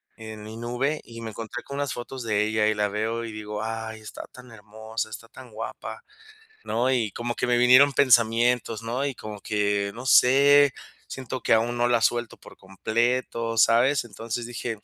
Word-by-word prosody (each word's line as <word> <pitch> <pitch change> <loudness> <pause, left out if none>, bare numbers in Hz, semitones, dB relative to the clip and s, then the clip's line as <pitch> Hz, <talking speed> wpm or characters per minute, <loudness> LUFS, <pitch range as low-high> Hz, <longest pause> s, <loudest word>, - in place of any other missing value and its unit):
en 110 -1 -9
mi 110 +1 -9
nube 125 +6 -2
y, 115 -1 -11
me 110 -1 -6
encontré 115 +3 -7
con 140 - -8
unas 145 -1 -2
fotos 120 +1 -7
de 105 -2 +1
ella 110 0 +1
y - - +2
la 105 0 0
veo 110 +3 -2
y 115 - -7
digo: 105 0 -6
"Ay, 110 0 -5
está 110 - -9
tan 125 -1 -14
hermosa, 110 +1 -6
está 110 +2 -9
tan 125 0 -14
guapa", 110 +1 -7 0.6
¿no? 125 +3 0
Y 115 -5 0
como 120 0 -4
que - - -2
me 120 0 +2
vinieron 130 +3 +6
pensamientos, 120 -3 +3
¿no? 120 +5 -2
Y 140 -2 -3
como 105 -2 -8
que, 100 -1 0
no 125 +2 -8
sé, 140 +2 +6 0.3
siento 130 -1 -6
que - - +2
aún 115 +2 +1
no 120 0 +2
la 120 -1 +2
suelto 120 0 0
por - - -15
completo, 115 +4 -2
¿sabes? 120 +6 +4
Entonces 115 +1 -5
dije: 120 -1 -5
115 Hz, 190 wpm, -25 LUFS, 110-125 Hz, 0.6 s, vinieron